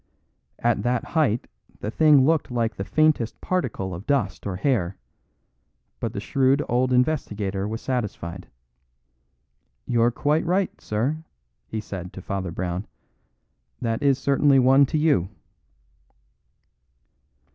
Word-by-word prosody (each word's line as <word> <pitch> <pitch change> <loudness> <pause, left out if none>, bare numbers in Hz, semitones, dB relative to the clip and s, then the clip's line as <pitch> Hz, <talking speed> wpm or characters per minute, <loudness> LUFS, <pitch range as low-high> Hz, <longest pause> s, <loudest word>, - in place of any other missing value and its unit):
At 120 -3 +1
that 120 +2 0
height 140 -8 +1 0.3
the 105 - -4
thing 150 -1 +5
looked 160 -1 +2
like 115 -2 -1
the 95 - -4
faintest 155 -2 +1
particle 115 - -2
of 90 +4 -8
dust 125 -9 0
or 95 - -3
hair, 95 -5 0 1.0
but - - -2
the - - -3
shrewd 135 +1 +2
old 125 +2 +1
investigator 105 -8 0
was 110 +2 -4
satisfied. 100 -8 -4 1.4
"You're 120 -1 +3
quite 145 +6 +1
right, 185 +3 -1
sir," 130 +10 -2 0.4
he 110 - -4
said 95 -4 -7
to 95 - -8
Father 95 -2 -3
Brown; 90 +2 -4 0.9
"that 115 -1 -2
is 140 -2 +3
certainly 140 0 +3
one 135 +2 +5
to 155 - -1
you." 150 - +2
120 Hz, 125 wpm, -24 LUFS, 100-140 Hz, 1.4 s, thing